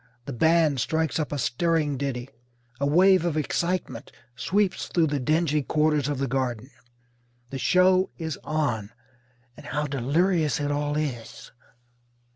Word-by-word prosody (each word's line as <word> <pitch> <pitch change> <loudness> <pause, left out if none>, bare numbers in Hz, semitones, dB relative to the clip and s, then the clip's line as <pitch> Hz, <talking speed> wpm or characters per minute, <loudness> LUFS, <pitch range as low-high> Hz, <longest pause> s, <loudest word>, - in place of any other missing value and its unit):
The 140 - -5
band 160 +1 +3
strikes 160 +5 0
up 155 - -2
a 145 - -2
stirring 150 +2 0
ditty. 130 -2 -3 0.5
A 140 - +1
wave 185 +4 +5
of 170 -3 -1
excitement 170 +4 -2 0.2
sweeps 190 - 0
through 170 -2 +2
the 145 -2 -1
dingy 155 +2 +1
quarters 150 0 +1
of 145 - -2
the 135 +1 -1
Garden. 130 -1 -2 0.8
The 135 - -4
show 185 +2 +3
is 160 -4 -4
on, 145 -10 -1 0.7
and - - -12
how 150 +2 -2
delirious 150 +4 +1
it 145 0 -1
all 145 0 -1
is! 130 -7 -5
150 Hz, 140 wpm, -25 LUFS, 135-165 Hz, 0.8 s, wave